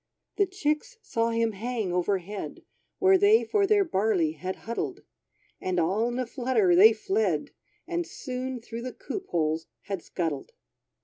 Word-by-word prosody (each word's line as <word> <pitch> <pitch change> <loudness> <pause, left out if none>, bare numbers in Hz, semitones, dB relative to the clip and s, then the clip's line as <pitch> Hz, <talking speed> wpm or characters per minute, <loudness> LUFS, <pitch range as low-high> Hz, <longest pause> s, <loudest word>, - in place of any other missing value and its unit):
The 400 -1 +3
chicks 375 +6 -2
saw 230 - 0
him 230 0 +1
hang 220 -2 -3
overhead, 190 +2 -2 0.3
Where 380 0 +5
they 420 +3 +6
for 405 -2 +2
their 410 -1 +5
barley 195 - +1
had 185 +5 -5
huddled; 230 +1 -3 0.6
And 185 -1 0
all 195 +8 +2
in 240 0 -3
a 255 - 0
flutter 240 -7 +2
they 210 +5 +9
fled, 385 - 0 0.4
And 345 0 -2
soon 255 -1 -5
through 230 0 -7
the 255 +1 -5
coop 380 -2 -6
holes 160 -1 0
had 195 -3 -4
scuddled. 160 -7 -3
230 Hz, 150 wpm, -27 LUFS, -, 0.6 s, they